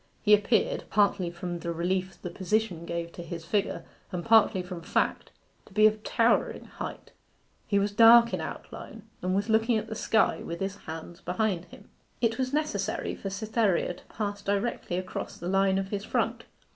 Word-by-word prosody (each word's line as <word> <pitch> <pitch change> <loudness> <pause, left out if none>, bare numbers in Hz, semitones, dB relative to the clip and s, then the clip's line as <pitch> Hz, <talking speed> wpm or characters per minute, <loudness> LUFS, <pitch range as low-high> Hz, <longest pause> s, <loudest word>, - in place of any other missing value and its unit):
He 210 - +5
appeared, 210 +1 +2
partly 200 -3 +2
from 175 0 -5
the 170 0 -3
relief 185 +3 -2
the 180 - -4
position 185 -2 -1
gave 170 0 -3
to 175 - -8
his 170 -1 -7
figure, 205 +3 -1 0.3
and 180 -2 -4
partly 220 -5 +5
from 180 -1 -7
fact, - - 0 0.4
to - - -17
be 215 +1 +5
of 215 0 +4
towering - - +1
height. - - -8 0.6
He 200 - +2
was 200 +1 +1
dark 230 +2 +7
in - - -1
outline, 225 - -8 0.2
and 185 +1 0
was 200 +2 0
looking 225 +1 +3
at 215 - -2
the - - -3
sky, 220 0 +2
with 170 0 -5
his 195 0 -2
hands 165 -1 -8
behind 185 -1 -1
him. - - -15 0.3
It 230 +1 +1
was 255 -1 0
necessary 280 -9 -1
for 195 - -5
Cytherea 210 -2 0
to - - -17
pass 205 -1 -4
directly 200 -3 -1
across 185 0 -5
the 175 - -6
line 195 0 +3
of 195 0 -2
his 200 -1 -3
front. - - -1
200 Hz, 185 wpm, -28 LUFS, 180-220 Hz, 0.6 s, dark